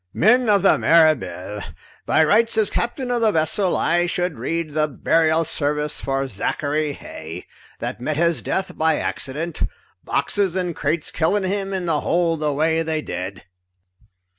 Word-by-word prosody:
"Men 245 +4 +4
of 200 -2 +4
the 195 - +4
Mirabelle, 105 - +2 0.5
by 160 - +4
rights 225 +7 +3
as 215 -2 +3
captain 245 +1 -2
of 240 -1 0
the 220 -2 +4
vessel 175 +3 +1
I 175 +1 +2
should 175 -5 -2
read 165 +4 -3
the 155 0 +1
burial 160 +3 +1
service 150 -1 -1
for 135 0 -1
Zachary 145 +7 -2
Heigh, 80 - -9 0.3
that - - -5
met 150 +3 -2
his 170 0 +2
death 190 0 -2
by 160 0 +2
accident, 155 +6 -2 0.4
boxes 195 -4 0
and 180 -3 -2
crates 155 +2 -1
killing 190 +6 +1
him 195 +1 -2
in 190 -2 -2
the 160 -3 0
hold 170 -2 +1
the 150 -1 0
way 160 +3 +1
they 160 -1 -2
did. 90 +1 -6
160 Hz, 160 wpm, -21 LUFS, 150-185 Hz, 0.5 s, Men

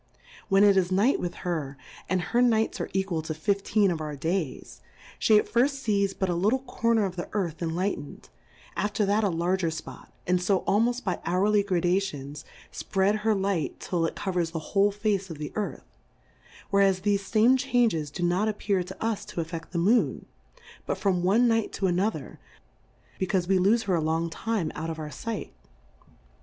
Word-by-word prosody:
When 195 +1 +5
it 200 -1 +6
is 185 -1 +2
Night 205 +8 +3
with 175 -1 -4
her, 150 -6 -3 0.3
and 185 - +2
her 235 +8 +1
Nights 225 -3 +2
arc - - -3
equal 190 -4 0
to 155 0 -5
fifteen 200 +4 +1
of 165 -2 -3
our 150 -1 -4
Days, 160 +1 -3 0.4
fhe 215 - +5
at - - +3
firft 270 +4 +1
fees 200 -5 0
but 190 - -1
a 175 - 0
little 200 +9 +2
Corner 230 -4 +1
of 185 -1 -5
the 175 - -4
Earth 180 -6 -2
en 165 -1 -2
lightened, 185 -5 -4 0.5
after 205 0 0
that 205 +2 +2
a 205 - +2
larger 175 +1 0
Spot, 160 0 -8
and 180 0 +1
fo 190 0 +2
almoft 235 +5 +1
by 185 -4 -2
hourly 200 +4 +2
Gradations, 175 -6 -1 0.3
fpread 200 +2 0
her 215 0 +2
Light 190 -5 -1
till 170 -2 -1
it - - -6
covers 180 -4 -1
the 165 -2 -7
whole 200 0 +4
Face 205 -2 -1
of 165 - -7
the 150 0 -6
Earth; 210 -1 -4 0.9
whereas 195 -2 +3
thefe 200 0 +2
fame 220 +5 +3
Changes 245 - +1
do 175 - -5
not 180 +5 +2
appear 200 -2 0
to 190 +4 -6
us 225 -3 -1
to - - -12
affeft 165 0 -5
the 175 - -4
Moon, 210 +8 +2 0.6
but - - -1
from 190 -2 +1
one 210 +7 +4
Night 225 -2 +1
to 195 - -2
ano 185 +3 +2
ther, 155 -10 -9 0.8
becaufe 185 -1 0
we 190 0 +3
lofe 215 +5 +3
her 195 - -1
a 170 - +2
long 160 +1 -1
time 210 -5 -2
out 160 - -4
of 160 - -4
our 155 -1 -6
Sight. 220 - -5
190 Hz, 190 wpm, -27 LUFS, 170-210 Hz, 0.9 s, it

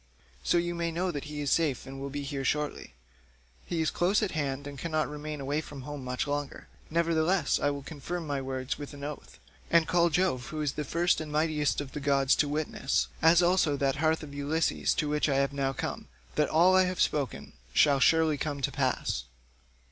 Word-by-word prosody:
So - - +2
you 175 0 0
may 170 -1 -2
know 180 +2 -1
he 150 0 -5
is 145 - -1
safe 150 -8 +1
and 135 0 -8
will 140 - -4
be 145 +1 -4
here 140 -1 -4
shortly; 145 - -2 0.7
he 165 - -1
is 160 - +1
close 195 +5 +2
at 205 - -1
hand 140 -3 -2
and 145 0 -7
cannot 155 -1 -1
remain 150 0 -6
away 145 +3 -1
from 145 -4 -9
home 145 -1 -6
much 125 0 -2
longer; 145 -1 -4 0.2
nevertheless 165 0 +2
I 145 - +2
will 140 -1 -4
confirm 165 +4 -5
my 140 -2 -2
words 130 +2 -3
with 145 0 -7
an 140 - -10
oath, 150 +1 -7 0.3
and 165 -1 +4
call 170 -1 +3
Jove 165 -8 0
who 155 - -5
is 150 -2 0
the 150 - -4
first 170 +2 +1
and 155 -1 -6
mightiest 150 -1 +1
of 140 -2 -9
all 150 - -3
gods 140 -1 +3
to 145 - +2
witness, 145 -2 -1
as 165 +2 +6
also 175 -5 +3
that 135 0 0
hearth 160 +1 +1
of 145 -2 -9
Ulysses 145 +3 0
to 155 - 0
which 150 +1 +1
I 140 - +2
have 140 +1 +1
now 135 -1 0
come, 135 - -5 0.3
that 150 -1 +1
all 175 +4 +5
I 185 0 +5
have 180 -1 -3
spoken 140 -5 -1 0.2
shall 140 - +4
surely 160 +1 +4
come 145 -1 -2
to - - 0
pass. 65 -1 -1
150 Hz, 210 wpm, -29 LUFS, 140-165 Hz, 0.7 s, as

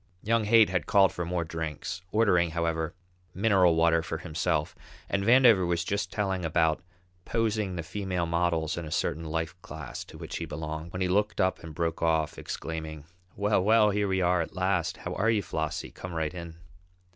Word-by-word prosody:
Young 115 0 +2
Haight 110 -2 +6
had 90 -5 -1
called 95 -2 +5
for 90 - -3
more 85 0 -1
drinks, 80 +2 -5
ordering, 95 -6 +3
however, 80 0 -2 0.4
mineral 95 -4 +4
water 85 0 +4
for 80 0 -4
himself, 80 -2 -1 0.3
and 100 -1 -1
Vandover 115 -3 +6
was 85 -1 0
just 100 +4 -2
telling 95 -3 -1
about 80 0 +1 0.4
posing 110 -4 -1
the 85 - -3
female 90 0 -2
models 85 -1 0
in 85 - -6
a - - -7
certain 80 +3 -1
life 80 +1 -2
class 80 -7 -7
to - - -12
which - - -6
he - - -4
belonged, 80 +2 -5
when 90 0 -2
he - - +1
looked 105 +3 +1
up 95 -1 +1
and 80 -3 -9
broke 85 -1 -2
off, 80 -2 +1
exclaiming: 80 -2 -6 0.3
"Well, 100 -1 +2
well, 105 0 +5
here 100 0 0
we 95 -1 +1
are 90 0 +3
at 80 - -6
last! 90 -2 0
How - - -5
are 110 +3 +1
you, 110 -3 +2
Flossie? 80 -2 -3
Come 90 -2 -8
right 80 0 -1
in." 85 -2 -7
85 Hz, 190 wpm, -28 LUFS, 80-100 Hz, 0.4 s, Haight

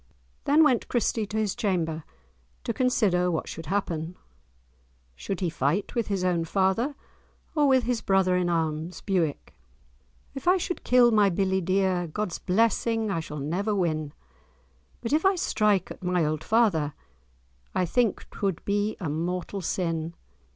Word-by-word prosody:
Then 300 +3 +5
went 260 -6 +2
Christie 225 -2 0
to 210 - -4
his 215 -3 0
chamber, 165 -6 -1 0.6
to - - -2
consider 200 -8 +2
what 165 -3 -2
should 165 - -7
happen. 175 -4 -2 1.0
Should 190 - -5
he 180 - +1
fight 160 +6 -1
with 235 -2 -1
his 195 -3 -1
own 175 -2 +1
father, 195 - +1 0.6
or 295 -2 +3
with 260 -2 +4
his 240 -1 -1
brother 190 -2 +2
in 180 -1 +1
arms, 160 0 -2
Bewick? 175 -7 -1 0.8
"If 270 +5 -7
I 365 +1 +6
should 355 0 -4
kill 245 -1 +5
my 210 -2 +4
billie 190 +1 +1
dear, 185 -1 +1
God's 180 +2 -3
blessing 225 +2 +1
I 165 - 0
shall 150 -2 -6
never 185 +9 -1
win; 155 -5 -1 0.9
But 230 - -2
if 310 - +3
I 385 0 +4
strike 210 - +1
at - - -9
my 180 -2 +1
auld 155 0 -2
father, 190 -11 +2 0.8
I 185 - +2
think 230 +4 0
'twould 195 -5 -2
be 205 +1 0
a 180 - -3
mortal 180 +5 -3
sin. 165 -2 -2
190 Hz, 155 wpm, -26 LUFS, 170-220 Hz, 1.0 s, I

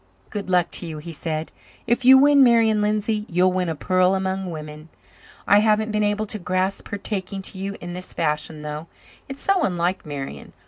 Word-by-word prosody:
"Good 205 -3 -5
luck 180 -2 +2
to 175 - -5
you," 160 -1 -6
he 165 +2 -8
said. 155 +1 -3 0.3
"If 240 +2 +1
you 260 +1 +9
win 285 0 +6
Marian 225 -3 +4
Lindsay 210 +1 0
you'll 180 +2 +3
win 180 -1 -1
a 160 - -2
pearl 185 +4 +2
among 190 0 -2
women. 155 -1 -8 0.6
I 205 - +6
haven't 215 0 +2
been 210 0 0
able 210 +1 0
to 215 +1 -6
grasp 185 +2 -1
her 205 - -4
taking 195 -1 -5
to 190 - -7
you 200 +1 -4
in 175 0 -7
this 180 +1 -8
fashion, 150 -1 -2
though. 150 +2 -6 0.4
It's 270 +1 -7
so 390 -2 +2
unlike 180 - 0
Marian. 135 - -7
190 Hz, 195 wpm, -23 LUFS, 170-210 Hz, 0.6 s, you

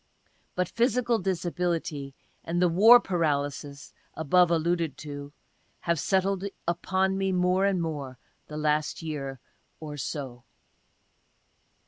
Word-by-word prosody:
But 180 -1 0
physical 235 +1 +1
disability 170 -6 -2 0.3
and 170 +1 -2
the 180 - +4
war 215 +8 +8
paralysis 145 -6 -2 0.2
above 175 +3 +4
alluded 170 -2 0
to 145 -1 -7 0.5
have 170 -2 0
settled 190 +2 +1 0.2
upon 190 +2 0
me 195 0 +1
more 180 +1 +2
and 195 -2 +1
more, 145 -6 -4 0.3
the 150 - -7
last 150 +1 0
year 135 -4 -5 0.4
or 150 -2 -7
so.) 130 -4 -5
170 Hz, 110 wpm, -27 LUFS, 145-185 Hz, 0.5 s, war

